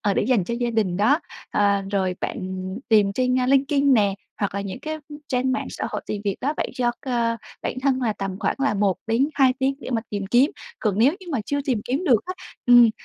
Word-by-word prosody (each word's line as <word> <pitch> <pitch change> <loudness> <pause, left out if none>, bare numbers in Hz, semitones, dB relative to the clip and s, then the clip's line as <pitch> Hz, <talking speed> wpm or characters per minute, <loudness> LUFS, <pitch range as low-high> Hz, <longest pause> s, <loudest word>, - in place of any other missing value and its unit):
ờ, 200 -1 +1
để - - +2
dành 225 -5 +2
cho 235 - -3
gia 240 -1 +1
đình 205 -6 0
đó. 265 +11 +3 0.3
Ờ, 200 -1 +2
rồi 190 -2 0
bạn - - -3 0.5
tìm 210 -3 +4
trên, 255 +2 +1
a, 250 - +1
LinkedIn 275 0 +4
nè, 205 -3 +3 0.3
hoặc 205 -2 -1
là 200 - -1
những 200 +4 -6
cái, 310 0 -4
ừm, 295 0 -9
trang 260 -1 +1
mạng 270 - -2
xã - - -4
hội - - -3
tìm 205 -1 -4
việc 200 - 0
đó 290 +4 0
bạn - - 0
cho 245 -1 +1
co 235 -3 0 0.3
bản - - -3
thân 265 -2 +2
là 225 -3 +1
tầm 195 -1 -3
khoảng - - +1
là 270 -6 +1
1-2 260 - +1
để - - -7
mà 235 -3 +1
tìm 200 -2 -3
kiếm. 245 +8 +4 0.3
Còn 210 -2 0
nếu 260 +7 +5
như 375 - -13
mà 270 - +1
chưa 285 - 0
tìm 250 -7 0
kiếm 270 +8 -1
được 240 - +4
á, 370 - -2 0.3
ừm, 240 -2 +8
240 Hz, 235 wpm, -23 LUFS, 205-270 Hz, 0.5 s, ừm